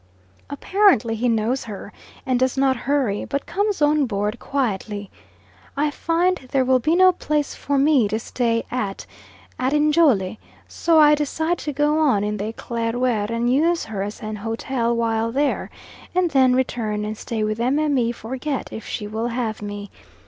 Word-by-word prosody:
Apparently 285 - +2
he 240 +2 0
knows 230 +4 0
her, 210 -1 -8 0.3
and 255 -2 +1
does 260 +1 +1
not 265 -1 +3
hurry, 260 -5 0
but 280 0 -3
comes 405 -2 0
on 295 -2 +3
board 210 +1 -2
quietly. 210 -6 -3 0.7
I 295 +1 +1
find 345 +4 +1
there 265 -1 +2
will 260 0 +4
be 310 +7 +1
no 370 +1 +6
place 300 -4 -2
for 285 0 -2
me 275 -5 +4
to 215 - -1
stay 230 0 -1
at 210 -6 -3 0.5
at 260 +2 0
Njole, 295 - +3 0.3
so 330 -2 +2
I 300 -1 +7
decide 320 +3 -1
to 295 - -3
go 295 +2 +1
on 260 -10 +3
in 210 0 -2
the 210 +2 -3
Eclaireur 230 -1 -1
and 235 +2 0
use 335 +5 +2
her 215 -3 -5
as 205 +2 -5
an 215 0 -5
hotel 230 +2 -2
while 230 -1 0
there, 280 +3 0 0.5
and 360 -2 +2
then 260 -2 +4
return 220 -5 -1
and 215 +1 -4
stay 220 0 -3
with 215 +1 -2
Mme. 265 -1 +1
Forget 260 +5 -4
if 220 - -7
she 210 - -4
will 220 +3 -3
have 230 -3 -3
me. 205 -1 -6
250 Hz, 170 wpm, -22 LUFS, 220-295 Hz, 0.7 s, I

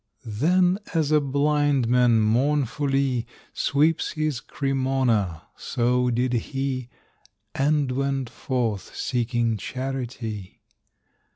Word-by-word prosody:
Then 175 - +2 0.2
as 155 -2 +1
a 150 -1 +5
blind 145 -2 +1
man 120 -2 +4
mournfully 135 +1 +1 0.3
Sweeps 150 +3 +1
his 155 -5 -1
Cremona, 130 - 0
so 125 +1 0
did 125 +1 0
he, 130 +1 -2 0.6
And 145 -1 +1
went 135 0 -1
forth, 115 -7 -3
seeking 120 -2 0
charity. 120 -4 -5
130 Hz, 90 wpm, -24 LUFS, 120-140 Hz, 0.6 s, a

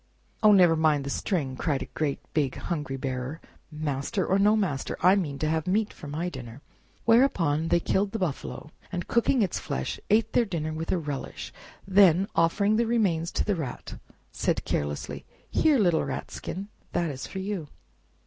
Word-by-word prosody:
"Oh, 215 - +7
never 180 -5 +6
mind 155 -3 +2
the 140 - -4
string!" 145 -9 -1
cried 140 0 -1
a 130 - -14
great 150 -3 -1 0.2
big 145 -4 +1
hungry 145 -6 -3
bearer; 130 +3 -4 0.3
master 150 +4 -2
or 195 - +2
no 210 +2 +5
master, 180 -11 -1
I 185 +2 +6
mean 155 -8 -1
to 155 - -1
have 160 +1 0
meat 210 +3 +1
for - - -10
my 155 +5 -3
dinner!" 130 -5 -8 0.4
Whereupon 175 - +3
they 170 - +3
killed 195 +3 0
the 225 - -2
buffalo, 155 -4 -4 0.2
and 180 -2 -4
cooking 235 0 +3
its 185 - -1
flesh, - - -3
ate 215 +1 +3
their 245 - +4
dinner 160 -6 -3
with 160 +1 -3
a - - +2
relish; 145 -4 -5 0.3
then, 190 -1 +5
offering 200 +6 +3
the 235 0 +2
remains 185 -8 +1
to - - +1
the 210 - +1
Rat, 155 -9 -5 0.3
said - - -1
carelessly, 75 0 -3 0.3
"Here, 305 -3 +4
little 175 -7 +3
Rat - - -4
skin, 195 +3 -6 0.2
that 170 -3 0
is 135 -1 -6
for - - -8
you!" 190 -4 -3
165 Hz, 180 wpm, -27 LUFS, 145-200 Hz, 0.4 s, Oh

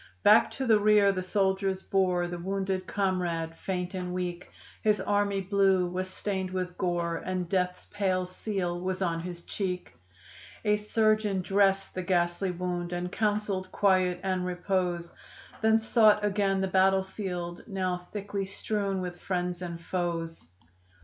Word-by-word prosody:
Back 210 +1 +7
to 265 - -3
the 220 -3 +5
rear 205 -1 +5
the 185 -1 -2
soldiers 190 0 0
bore 185 -2 +1
The 175 0 -5
wounded 190 0 -2
comrade, 175 -4 -1
faint 180 0 -3
and 180 -1 -3
weak; 180 -1 -4 0.3
His 210 -1 +3
"army 205 -1 +1
blue" 190 -1 +3
was 185 +1 -3
stained 190 -1 -3
with 185 -1 -3
gore, 175 -2 -1
And 185 -1 -3
death's 180 0 -1
pale 190 -3 +1
seal 180 -2 -3
was 185 +1 -1
on 165 -2 0
his 170 0 -7
cheek. 180 -3 -4 0.7
A 210 0 +4
surgeon 215 -2 +1
dressed 195 0 +2
the 185 - -3
ghastly 175 +1 +1
wound 175 -1 -3
And 175 0 -3
counseled 205 -3 -1
quiet 185 -3 +2
and 185 -1 0
repose, 180 -1 -1 0.5
Then 220 0 +5
sought 215 -2 +4
again 195 -1 +1
the 190 - +1
battleground, 190 -2 0
Now 185 -3 -2
thickly 200 -1 -3
strewn 200 0 -2
with 175 -1 -6
friends 180 -1 -2
and 170 -2 -5
foes. 165 - -3
185 Hz, 145 wpm, -29 LUFS, 180-200 Hz, 0.7 s, Back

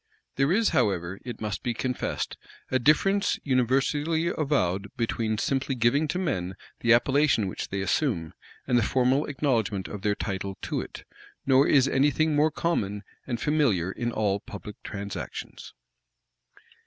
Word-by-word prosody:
There 135 +3 +2
is, 220 +4 +3
however, 95 -1 0
it 120 -3 -7
must 105 -3 -3
be 120 -1 -2
confessed, 125 +1 -2 0.4
a 130 - +3
difference 195 +9 +3
universally 145 +5 +1
avowed 100 - 0
between 115 -2 -1
simply 135 +3 -1
giving 125 +6 +2
to 180 - -2
men 95 - -2 0.2
the 120 - +2
appellation 130 -2 +4
which 95 - -4
they 100 0 -2
assume, 95 - 0 0.3
and 120 - +3
the - - +1
formal 130 +5 +2
acknowledgment 115 - 0
of 105 - -7
their 105 0 +1
title 95 -1 -4
to - - -1
it; - - -9 0.4
nor 135 +1 +5
is 135 -2 +5
any 140 +1 +3
thing 155 +2 +1
more 150 +2 +4
common 105 -12 -1 0.2
and 120 -3 -2
familiar 120 - +1
in 120 +3 -3
all 100 -3 0
public 105 +1 -10
transactions. 100 -1 -7
120 Hz, 150 wpm, -27 LUFS, 100-145 Hz, 0.4 s, nor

